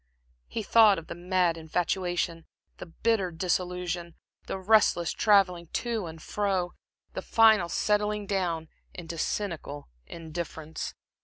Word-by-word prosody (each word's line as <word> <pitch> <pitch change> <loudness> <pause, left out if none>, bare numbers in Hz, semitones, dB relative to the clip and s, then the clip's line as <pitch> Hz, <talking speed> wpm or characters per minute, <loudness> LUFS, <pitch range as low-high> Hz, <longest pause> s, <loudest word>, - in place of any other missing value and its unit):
He 225 - -4
thought 215 -2 +6
of 165 - -7
the - - -6
mad 175 -1 +1
infatuation, 175 0 -1 0.3
the - - -8
bitter 200 +2 0
disillusion, 175 0 -2 0.3
the - - -3
restless 190 -4 +3
travelling 185 -5 +3
to 230 -6 -2
and 160 0 -9
fro, 190 0 -1 0.4
the - - -4
final 220 -6 +5
settling 210 +2 0
down 175 -5 -1 0.3
into 170 -2 -7
cynical 160 - -3 0.2
indifference.... 160 -1 -6
180 Hz, 115 wpm, -28 LUFS, 170-205 Hz, 0.4 s, thought